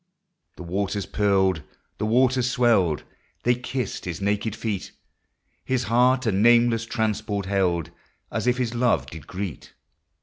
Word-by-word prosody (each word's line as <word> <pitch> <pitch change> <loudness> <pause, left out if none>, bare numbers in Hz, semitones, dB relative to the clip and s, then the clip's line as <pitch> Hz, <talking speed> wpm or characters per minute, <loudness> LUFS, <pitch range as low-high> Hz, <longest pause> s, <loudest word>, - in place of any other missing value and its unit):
" 175 - -51
The - - -8
waters 100 +3 -2
purled, 95 -5 +2 0.4
the 105 - 0
waters 125 +2 +3
swelled, 110 -11 +2 0.2
— - - -40
They 125 - +4
kissed 125 -2 -4
his 85 -2 -4
naked 100 +2 -1
feet; 110 -4 -4 0.7
His 130 -1 0
heart 125 +3 +3
a 110 - +2
nameless 115 +3 +4
transport 110 -3 -2
held, 90 -4 0 0.4
As - - -2
if 125 0 +3
his 125 -2 -1
love 120 0 +2
did 80 -2 -11
greet. 95 -6 -6
110 Hz, 145 wpm, -24 LUFS, 95-120 Hz, 0.7 s, They